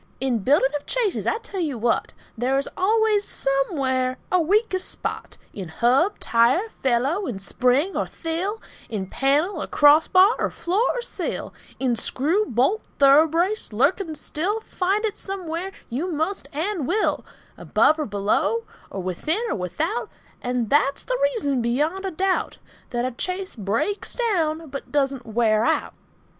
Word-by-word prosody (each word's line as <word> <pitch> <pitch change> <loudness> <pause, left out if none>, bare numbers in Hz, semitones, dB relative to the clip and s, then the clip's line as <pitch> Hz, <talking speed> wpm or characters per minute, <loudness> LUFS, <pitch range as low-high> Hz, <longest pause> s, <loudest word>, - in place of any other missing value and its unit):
Now 265 - -2
in 240 -3 +1
building 270 +5 +3
of 290 - -5
chaises, 470 -6 -1
I - - +2
tell 400 -4 -7
you 300 -7 -1
what, 230 +1 0 0.2
There 255 +4 0
is 275 - -1
always 430 +1 +2
somewhere 270 -4 0
a 365 -1 +4
weakest 380 +2 +1
spot, - - -5 0.2
In 190 -3 -6
hub, 255 - +2
tire, 250 - +2
felloe, 270 +10 +1
in 225 - -3
spring 255 - +1
or - - -1
thill, 350 +7 -3 0.3
In 205 -4 -3
panel, 295 - +1
or - - -4
crossbar, 320 +8 +6
or - - +1
floor, 370 +5 -1
or - - -3
sill, - - -4 0.3
In 255 -3 +1
screw, 315 - 0
bolt, 270 - +1
thoroughbrace, 320 - +4
lurking 310 - +1
still, 360 +8 -2
Find 400 +1 -1
it 425 -1 -3
somewhere 370 -1 -4 0.2
you 300 +10 -3
must 320 -1 -2
and 320 0 -2
will, 425 +5 +1 0.3
Above 310 - +2
or 305 - -1
below, 205 - 0 0.3
or 195 - -5
within 305 - -1
or - - 0
without, 305 - -2 0.3
And 245 -3 -2
that's 280 -1 +2
the - - -2 0.2
reason, 280 - 0
beyond 300 +11 0
a - - 0
doubt, 375 +3 0 0.3
That 240 0 -1
a 255 - -2
chaise 370 +6 -4
breaks 225 - -2
down, 330 - 0
but 275 - -7
doesn't 275 -4 0
wear 220 -1 +2
out. - - 0
305 Hz, 155 wpm, -23 LUFS, 255-385 Hz, 0.3 s, crossbar